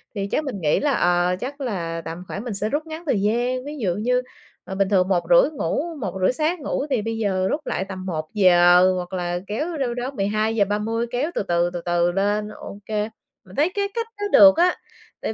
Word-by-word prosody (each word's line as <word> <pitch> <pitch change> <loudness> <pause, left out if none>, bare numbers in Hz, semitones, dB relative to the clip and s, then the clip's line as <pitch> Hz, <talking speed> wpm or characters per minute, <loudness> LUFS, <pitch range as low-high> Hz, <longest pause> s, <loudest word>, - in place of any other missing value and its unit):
Thì 195 -1 -2
chắc 310 - +1
mình 250 -10 -5
nghĩ 150 -2 +2
là, 290 -1 +1
ờ, 175 -3 +2
chắc 280 +3 -6
là 170 -9 -3
tầm 165 +2 -6
khoảng 200 - -5
mình 240 -4 -4
sẽ 210 +2 -2
rút 300 +4 -2
ngắn 320 +2 -7
thời 230 -10 +1
gian, 245 +5 0
ví 300 +1 -6
dụ 190 -9 -1
như, 250 +4 +1 0.4
ờ, 190 - -7
bình 195 0 +1
thường 185 -3 +3
1:30 195 - +4
ngủ, 280 - -2
1:30 190 -3 0
sáng 315 +5 0
ngủ, 275 - -2
thì 255 -6 +1
bây 225 +1 -3
giờ 190 -4 0
rút 300 - -1
lại 190 - -1
tầm 185 -1 -6
1:00, 175 +1 +4
hoặc 180 0 -5
là 175 -1 -2
kéo 310 +10 -3
đâu 255 -4 -1
đó 245 +2 -4
12:30 215 0 0
kéo 270 +7 -1
từ - - 0
từ, 175 -2 +1
từ 175 - -4
từ 175 0 +1
lên, 205 +3 0
OK. 205 -1 -11 0.6
Mình 185 - -14
thấy 305 +4 +3
cái 400 0 0
cách 460 0 -2
đó 410 - -3
được 290 -1 +8
á, 355 +2 +4 0.5
tại - - -2
210 Hz, 215 wpm, -23 LUFS, 185-265 Hz, 0.6 s, được